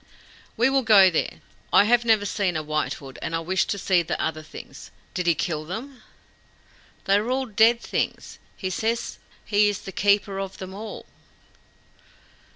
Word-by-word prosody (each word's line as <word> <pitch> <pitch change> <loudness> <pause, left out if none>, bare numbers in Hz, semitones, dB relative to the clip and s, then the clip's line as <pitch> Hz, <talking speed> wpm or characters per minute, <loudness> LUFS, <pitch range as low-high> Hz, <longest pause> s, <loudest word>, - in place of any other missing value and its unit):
"We 235 - +4
will 270 0 +2
go 205 -6 +6
there. 160 - -2 0.3
I - - +7
have 240 +3 +3
never 220 -3 +3
seen 190 -4 -1
a 155 - -3
White 155 0 -1
Hood, 135 -2 -11
and 165 - -3
I - - 0
wish 185 +3 0
to 200 - -3
see 185 -2 +2
the 165 - -3
other 160 -1 -2
things. 155 - -11 0.2
Did 180 -1 -2
he 170 - +4
kill 155 -2 -2
them?" 230 - -7 1.0
"They 195 +1 +4
are 215 +4 -2
all 260 +1 0
dead 230 +1 +4
things. - - -3 0.2
He 185 - -3
says 230 +5 -2 0.3
he 205 0 +3
is 205 - -4
the 195 - -8
keeper 200 0 +1
of 195 -1 -5
them 190 0 -8
all." 210 +2 -8
200 Hz, 175 wpm, -24 LUFS, 175-225 Hz, 1.0 s, I